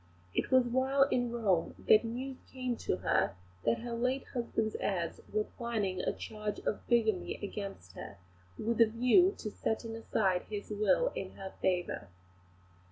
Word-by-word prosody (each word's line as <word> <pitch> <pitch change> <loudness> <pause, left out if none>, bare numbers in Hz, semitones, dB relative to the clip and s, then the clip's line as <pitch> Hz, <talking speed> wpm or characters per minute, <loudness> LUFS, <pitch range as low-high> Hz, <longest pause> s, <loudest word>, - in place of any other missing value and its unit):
It - - 0
was 260 -1 +5
while 260 +3 +3
in 245 -1 +1
Rome 200 -8 +1
that 215 - +7
news 255 +3 -4
came 255 -2 -2
to - - -1
her - - +1 0.3
that 115 - +2
her 240 0 -4
late 255 +3 0
husband's 225 -3 -1
heirs 175 -4 -1
were 215 0 +2
planning 210 -6 -2
a - - +1
charge 210 -1 -5
of - - -3
bigamy 220 -6 +2
against 195 - -6
her, 100 - -8 0.4
with 230 +1 0
a 230 - +8
view 250 - +4
to 215 - -5
setting 225 +2 -2
aside 195 -5 +1
his 205 0 -5
will 210 - +3
in - - -5
her 190 -1 -8
favour. 175 - 0
225 Hz, 160 wpm, -32 LUFS, 200-245 Hz, 0.4 s, a